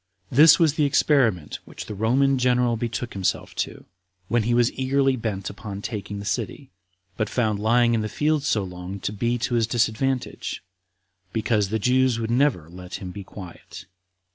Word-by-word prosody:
This 150 Hz, +4 st, +8 dB
was 160 Hz, -4 st, +3 dB
the 155 Hz, -, +1 dB
experiment 130 Hz, -, +2 dB
which -, -, -9 dB
the -, -, -6 dB
Roman 130 Hz, +6 st, +2 dB
general 125 Hz, -1 st, +2 dB
betook 120 Hz, +1 st, -4 dB
himself 95 Hz, -2 st, -2 dB
to, -, -, -4 dB, 0.4 s
when 120 Hz, +2 st, +2 dB
he 115 Hz, +3 st, 0 dB
was 120 Hz, 0 st, +3 dB
eagerly 135 Hz, 0 st, +1 dB
bent 105 Hz, -5 st, -4 dB
upon 100 Hz, 0 st, -7 dB
taking 105 Hz, -2 st, -5 dB
the 100 Hz, -, -7 dB
city; 115 Hz, +6 st, -3 dB, 0.5 s
but 110 Hz, -2 st, -1 dB
found 110 Hz, -4 st, 0 dB
lying 120 Hz, +2 st, +3 dB
in 115 Hz, -, +1 dB
the 110 Hz, -, -3 dB
field 150 Hz, +7 st, +1 dB
so 115 Hz, -8 st, 0 dB
long 90 Hz, +1 st, -7 dB
to 100 Hz, -, -3 dB
be 120 Hz, +3 st, 0 dB
to 125 Hz, +1 st, -2 dB
his 115 Hz, -2 st, +2 dB
disadvantage, 120 Hz, +2 st, -1 dB, 0.7 s
because 110 Hz, -3 st, +1 dB
the 110 Hz, -, 0 dB
Jews 125 Hz, +2 st, +2 dB
would 115 Hz, 0 st, -2 dB
never 125 Hz, -, +2 dB
let 90 Hz, +1 st, -9 dB
him 95 Hz, -2 st, -6 dB
be 100 Hz, +2 st, -8 dB
quiet. 95 Hz, 0 st, -11 dB
115 Hz, 175 wpm, -24 LUFS, 100-130 Hz, 0.7 s, This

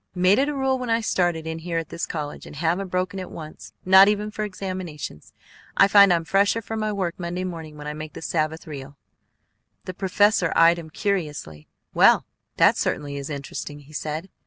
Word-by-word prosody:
"Made 185 Hz, +5 st, +4 dB
it 280 Hz, +2 st, +2 dB
a 295 Hz, -, -3 dB
rule 265 Hz, -1 st, 0 dB
when 250 Hz, -2 st, -4 dB
I 230 Hz, 0 st, +3 dB
started 175 Hz, -7 st, 0 dB
in 160 Hz, 0 st, -4 dB
here 165 Hz, 0 st, -3 dB
at 165 Hz, -2 st, -3 dB
this 170 Hz, -, -4 dB
college, 150 Hz, -3 st, -5 dB
and -, -, -11 dB
haven't 170 Hz, +6 st, 0 dB
broken 185 Hz, +1 st, -2 dB
it 185 Hz, -, -6 dB
once, 155 Hz, -1 st, -10 dB
not 190 Hz, +1 st, +8 dB
even 210 Hz, 0 st, 0 dB
for 215 Hz, -, -4 dB
examinations. 185 Hz, -, -6 dB, 0.5 s
I 195 Hz, -, +7 dB
find 200 Hz, -1 st, +7 dB
I'm 170 Hz, -1 st, +1 dB
fresher 200 Hz, +5 st, +2 dB
for 225 Hz, 0 st, -6 dB
my 215 Hz, -1 st, -1 dB
work 185 Hz, -4 st, -3 dB
Monday 175 Hz, +1 st, -3 dB
morning 165 Hz, -4 st, -7 dB
when 150 Hz, -, -9 dB
I 150 Hz, -, -4 dB
make 155 Hz, 0 st, -8 dB
the -, -, -9 dB
Sabbath 160 Hz, 0 st, -2 dB
real." 140 Hz, -2 st, -9 dB, 0.9 s
The 185 Hz, -, -5 dB
professor 195 Hz, -1 st, +2 dB
eyed 170 Hz, +1 st, +5 dB
him 160 Hz, -1 st, -9 dB
curiously. 150 Hz, -, -3 dB, 0.3 s
"Well, -, -, +5 dB, 0.3 s
that -, -, +5 dB
certainly 145 Hz, -1 st, -2 dB
is 140 Hz, 0 st, -5 dB
interesting," 145 Hz, 0 st, -6 dB
he 145 Hz, +2 st, -17 dB
said. 155 Hz, +4 st, -5 dB
175 Hz, 200 wpm, -24 LUFS, 155-195 Hz, 0.9 s, not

